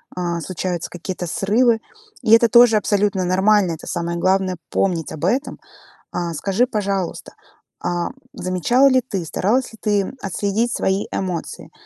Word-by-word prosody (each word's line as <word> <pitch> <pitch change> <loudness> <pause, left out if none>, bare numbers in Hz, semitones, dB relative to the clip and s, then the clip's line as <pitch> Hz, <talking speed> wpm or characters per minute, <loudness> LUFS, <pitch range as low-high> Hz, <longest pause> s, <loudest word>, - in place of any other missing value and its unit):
а, 175 -1 -2
случаются 180 +1 -4
какие-то 180 +1 -5
срывы. 225 +5 +2 0.4
И 225 -3 0
это 230 +1 +7
тоже 240 -1 +7
абсолютно 205 -2 +1
нормально. 190 0 +3
Это 160 - -7
самое 170 0 -2
главное 185 0 +1
помнить 175 -5 0
об 155 - -8
этом. 260 +10 -1 0.5
А, 170 -1 -3
скажи, 195 +9 +1
пожалуйста, 200 -6 -3 0.5
а 175 0 -1 0.2
замечала 210 +9 +2
ли 260 -1 +3
ты, 205 -8 -4
старалась 225 +11 0
ли - - -12
ты 205 -2 0
отследить 205 +4 -1
свои 190 +1 0
эмоции? 180 -3 -4
195 Hz, 140 wpm, -20 LUFS, 180-220 Hz, 0.5 s, это